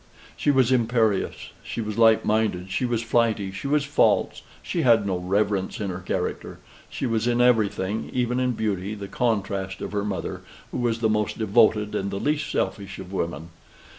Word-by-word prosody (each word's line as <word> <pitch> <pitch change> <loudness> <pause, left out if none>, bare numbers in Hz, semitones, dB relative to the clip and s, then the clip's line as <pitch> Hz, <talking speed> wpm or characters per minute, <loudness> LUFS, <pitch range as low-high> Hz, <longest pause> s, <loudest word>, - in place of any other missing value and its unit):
She - - 0
was 130 -3 +4
imperious, 115 -4 +1
she - - -6
was 105 -2 -3
light 115 -1 +5
minded, 105 -4 0
she 125 - 0
was 120 -2 -1
flighty, 115 -4 +1
she 95 +8 -6
was 145 +1 +2
false, - - +2 0.2
she - - -2
had 115 -4 +4
no 95 -2 0
reverence 100 +1 -1
in 100 -3 -2
her 90 - -5
character; 90 - -3 0.3
she - - -4
was 115 -1 0
in 120 0 +1
everything, 110 -4 +1
even 125 0 0
in 125 -1 +1
beauty, 105 -2 -2
the 100 -1 -7
contrast 100 -4 -1
of - - -5
her 100 -1 -1
mother, 95 -5 -4 0.3
who - - -3
was 115 -2 0
the 110 - +3
most 105 -1 0
devoted 110 -1 +3
and 100 -2 -1
the 100 - -4
least 150 +3 -1
selfish 100 -2 -2
of 95 0 -9
women. 85 -2 -3
110 Hz, 185 wpm, -24 LUFS, 100-120 Hz, 0.3 s, light